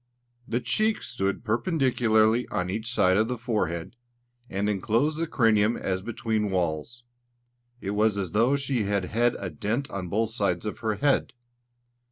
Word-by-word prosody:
The 120 - 0
cheeks 215 - 0
stood 95 +3 -2
perpendicularly 120 - +2
on 90 0 -2
each 110 +3 -3
side 95 -5 +3
of 110 +1 +3
the 125 0 -3
forehead, 105 -7 -2 0.5
and 100 +2 -1
enclosed 115 +9 +1
the 165 - 0
cranium 115 -5 +3
as 95 -1 -2
between 110 -1 -1
walls; 90 +6 -2 0.8
it 100 - -3
was 105 0 +2
as 95 -4 -2
though 115 +8 +3
she 135 -5 -1
had 100 -2 0
had 120 +5 +1
a 95 -3 -5
dent 120 +7 -2
on 95 -3 -4
both 110 +4 0
sides 100 -6 0
of 105 - -4
her 110 -2 -1
head. 140 +6 +1
110 Hz, 160 wpm, -26 LUFS, 100-120 Hz, 0.8 s, side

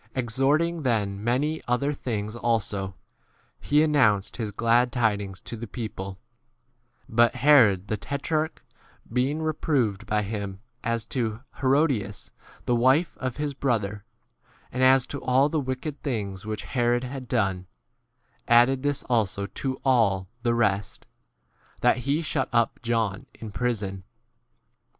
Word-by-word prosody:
Exhorting 135 +7 +1
x - - -7
then 105 -4 0
many 145 +7 0
other 140 +4 +1
things 110 -5 -4
also, 105 -5 -1 0.6
he 150 +1 +3
an 155 -1 +1
nounced 105 -8 +3
[his] 110 -3 -2
glad 120 +3 +2
tidings 100 -5 0
to - - -7
the 115 +1 -7
19 - - -32
people; 100 -5 -5 0.9
but 120 +1 +3
Herod 110 -10 +5
the 110 - -1
tetrarch 155 +6 -2 0.5
being 135 +6 0
reproved 130 -9 0
by 105 0 +1
him 100 -2 -5 0.2
as 115 -1 -1
to 115 -3 -2 0.2
Hero 140 +3 +4
dias, 105 -8 -3 0.3
the 120 - +2
wife 130 +8 +3
of 130 -2 -3
his 150 -1 -2
brother 105 -7 -1 0.4
J - - -34 0.2
and 130 +1 -1
as 130 0 +6
to 140 - -6
all 130 +3 +3
the 155 - 0
wicked 135 +2 -4
things 105 -7 -3
which 110 -1 -3
20 - - -11
Herod 120 -1 +2
had 130 0 -6
done, 95 -6 0 0.8
added 120 +3 +5
this 145 0 -1
also 105 -5 0
to 130 +5 -4
all 105 -8 +3
[the 120 -1 +1
rest], 100 -3 0 0.8
that 120 - +4
he 140 +6 0
shut 145 -4 -1
up 115 -1 +1
John 115 -5 -1
in 110 -2 -8
prison. 100 -5 -2
120 Hz, 145 wpm, -26 LUFS, 105-135 Hz, 0.9 s, as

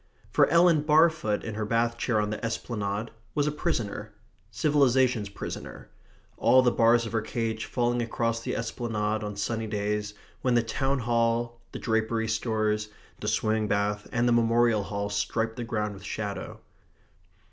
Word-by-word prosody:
For - - +5
Ellen 170 -1 +5
Barfoot 155 -7 +3
in 110 - -5
her 110 +1 -3
bath 115 +2 +1
chair 120 -2 0
on 105 0 -1
the 110 - -5
esplanade 110 -2 -3 0.2
was 145 -2 +2
a 150 - +1
prisoner 105 -9 -3 0.3
civilization's 130 -7 +2
prisoner 100 - -7 0.5
all 130 0 +5
the 125 - +4
bars 115 0 +4
of 115 - -5
her 115 -1 0
cage 110 0 -3
falling 120 0 0
across 115 0 -1
the - - -3
esplanade 110 -2 -2
on 105 -1 -4
sunny 110 +2 -2
days 105 0 -2 0.3
when 125 -1 +2
the 120 - +4
town 135 +4 0
hall, 115 0 0
the - - -6
drapery 110 0 0
stores, 110 -1 0 0.3
the 105 - -5
swimming 110 0 +1
bath, 105 0 0
and 120 +1 +1
the 120 - +4
memorial 115 -1 +3
hall 100 0 -3
striped 115 +2 -1
the 120 - -4
ground 105 -2 -2
with 95 -1 -12
shadow. 100 0 -5
115 Hz, 160 wpm, -27 LUFS, 105-120 Hz, 0.5 s, For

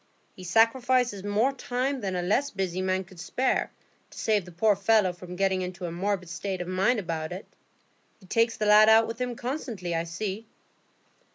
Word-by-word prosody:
He 185 - -11
sacrifices 230 +2 +2
more 210 +7 +1
time 260 +1 -2
than 190 -3 -2
a 180 - -1
less 235 +10 +1
busy 185 -4 -3
man 185 0 0
could 185 -1 -16
spare, 255 +10 0 0.4
to - - -16
save 210 -4 +1
the 180 - -11
poor 205 +5 +2
fellow 200 -1 +3
from 180 0 -10
getting 190 0 +1
into 180 0 -5
a 170 - -4
morbid 185 +1 -2
state 185 +3 -4
of 175 - -4
mind 190 +7 +2
about 165 -5 -3
it. 185 +3 -7 0.7
He 195 - -18
takes 230 +4 +1
the 215 - -1
lad 210 +1 +7
out 225 +1 +6
with 230 +2 -6
him 245 -1 -2
constantly, 235 - -4
I 165 0 -1
see." 200 +5 -5
200 Hz, 190 wpm, -27 LUFS, 180-230 Hz, 0.7 s, lad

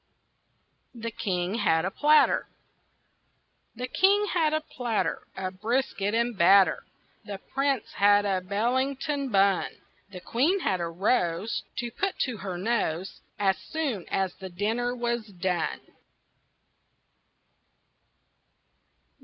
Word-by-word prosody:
THE 230 0 -5
KING 185 -4 -2
HAD 160 -3 +2
A 190 - -1
PLATTER 300 +5 +4 1.3
The 250 +2 -4
King 400 +8 +3
had 320 -4 +2
a 310 - +1
platter 245 -7 -2
Of 185 0 -5
brisket 225 -3 0
and 235 0 0
batter, 190 +2 +5 0.4
The 205 -2 -6 0.2
Prince 275 -2 +1
had 205 0 +5
a 190 -2 0
Bellington 260 +8 -1
bun, 195 -3 +3 0.4
The 190 -2 -9
Queen 315 - +1
had 185 - 0
a 170 - -1
rose 180 +2 0 0.2
To 240 -1 -3
put 390 +8 -2
to 250 -4 -5
her 190 -2 -5
nose 190 -4 -2 0.2
As 195 -2 +1
soon 275 - -3
as 190 -2 0
the 190 -1 -8
dinner 225 +7 -1
was 235 -2 -2
done. 180 - -2
215 Hz, 115 wpm, -27 LUFS, 190-255 Hz, 1.3 s, batter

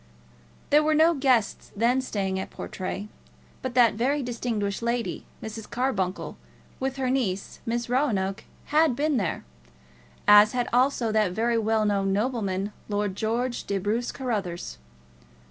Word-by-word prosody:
There 295 +1 +6
were 310 0 +2
no 320 +2 +5
guests 260 -7 +1
then 240 +5 +2
staying 195 -6 -2
at 190 - -5
Portray; 195 +2 -5 0.5
but 260 -2 -4
that 240 -3 +6
very 270 +6 0
distinguished 230 -5 -2
lady, 235 0 -2 0.2
Mrs. 220 0 -7
Carbuncle, 235 -7 -2 0.4
with 265 0 -2
her 260 -2 -1
niece, 200 -8 -2
Miss 235 +1 -1
Roanoke, 215 -7 0 0.3
had 310 -4 +4
been 295 +1 +1
there; 195 -7 -2 0.8
as 210 +2 +8
had 245 -1 0
also 250 -2 +2
that 215 -4 +2
very 230 +3 +1
well 220 0 +1
known 200 -2 +1
nobleman, 205 -3 -1 0.2
Lord 205 -2 -1
George 235 +4 -1
de 200 - -1
Bruce 215 +5 -1
Carruthers. 195 - -4
230 Hz, 140 wpm, -26 LUFS, 200-255 Hz, 0.8 s, as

